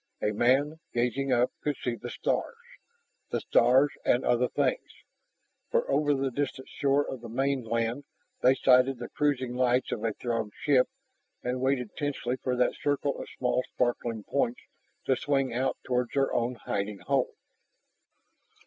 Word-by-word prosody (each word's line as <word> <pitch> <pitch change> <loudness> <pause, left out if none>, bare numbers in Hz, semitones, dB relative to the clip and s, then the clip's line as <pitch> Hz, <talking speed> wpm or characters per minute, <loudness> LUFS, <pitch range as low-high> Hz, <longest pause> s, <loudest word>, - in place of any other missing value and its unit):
A 105 - 0
man, 135 +8 +2 0.2
gazing 125 +3 0
up, 125 0 +3
could 145 -2 -1
see 125 - -2
the 120 - -7
stars. - - -1 0.7
The - - -1
stars 135 +4 +4
and 125 - +2
other 125 +1 +3
things, - - 0 0.8
for 485 0 +1
over 145 -1 +3
the 135 0 -1
distant 130 0 -3
shore 140 +1 +1
of 130 - -6
the 115 - -8
mainland 120 0 -1 0.4
they 130 +1 +5
sighted 130 0 +4
the 120 - -7
cruising 135 -4 0
lights 125 0 +2
of 105 - -3
a 115 -1 0
Throg 115 -3 -3
ship 135 -4 +3 0.5
and 125 +1 -2
waited 130 -4 0
tensely 135 -4 -2
for 130 -1 -1
that 125 0 +2
circle 145 -1 -1
of - - -7
small 125 0 +1
sparkling 120 -3 -1
points 125 -1 -1 0.4
to 130 - +3
swing 135 -2 0
out 130 +3 0
toward 125 -1 0
their 135 -1 +2
own 120 +1 0
hiding 100 -2 -3
hole. 135 -2 0
125 Hz, 155 wpm, -28 LUFS, 120-140 Hz, 0.8 s, they